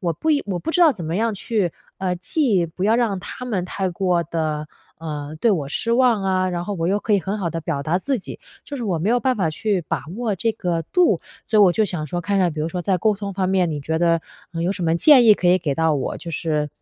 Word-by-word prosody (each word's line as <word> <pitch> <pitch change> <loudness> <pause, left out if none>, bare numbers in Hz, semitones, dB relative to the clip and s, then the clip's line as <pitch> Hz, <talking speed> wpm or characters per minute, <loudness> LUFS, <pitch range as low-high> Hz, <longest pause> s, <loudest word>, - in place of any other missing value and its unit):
我 170 -3 0
不 315 - -1
应 290 -2 +2
我 185 -3 -2
不 325 - -3
知 355 - +1
道 320 -4 +7
怎 175 -8 -8
么 165 +3 -2
样 225 0 0
去， 200 -4 -1 0.2
啊 185 -1 -1
既 190 - +1
不 180 +4 -5
要 220 - +4
让 220 -6 0
他 250 - -7
们 195 -7 -1
太 190 +1 -2
过 180 -1 0
地， 155 -2 -3 0.3
呃， 150 -2 -6
对 235 - +4
我 150 -9 0
失 230 +9 -1
望 240 -4 +3
啊， 185 -1 +1
然 175 -1 -2
后 205 +2 -3
我 165 -2 -2
又 200 +3 +2
可 215 - -1
以 200 - +4
很 195 +5 -3
好 180 -4 -1
地 165 0 -4
表 150 -4 -2
达 165 +5 0
自 265 +4 -1
己， - - -9 0.3
就 285 - -6
是 245 - -4
我 180 -5 -1
没 180 - -1
有 245 - +3
办 260 0 +1
法 185 -5 +1
去 200 +2 -1
把 - - -1 0.2
握 225 -5 -1
这 225 +4 0
个 175 -5 -2
度。 355 - +2 0.3
所 215 - +2
以 210 - +8
我 180 -3 +6
就 220 - +1
想 165 -6 -3
说 175 +5 -3
看 200 +3 0
看， 180 -4 +2
比 155 - -5
如 160 - -1
说 180 +1 -4
在 185 0 +1
沟 215 +4 +2
通 200 -1 -5
方 185 -1 -1
面， 185 -3 +2
你 150 -2 -3
觉 160 +3 -2
得， 170 -1 +2 0.3
呃， 165 0 -3
有 175 - +1
什 195 -2 -3
么 165 -1 +2
建 255 - +6
议 220 - +8
可 180 - -2
以 180 - +6
给 150 -6 -2
到 160 0 +2
我， 140 - -2
就 170 - -8
是， 150 -1 -1
185 Hz, 305 characters per minute, -21 LUFS, 165-215 Hz, 0.3 s, 以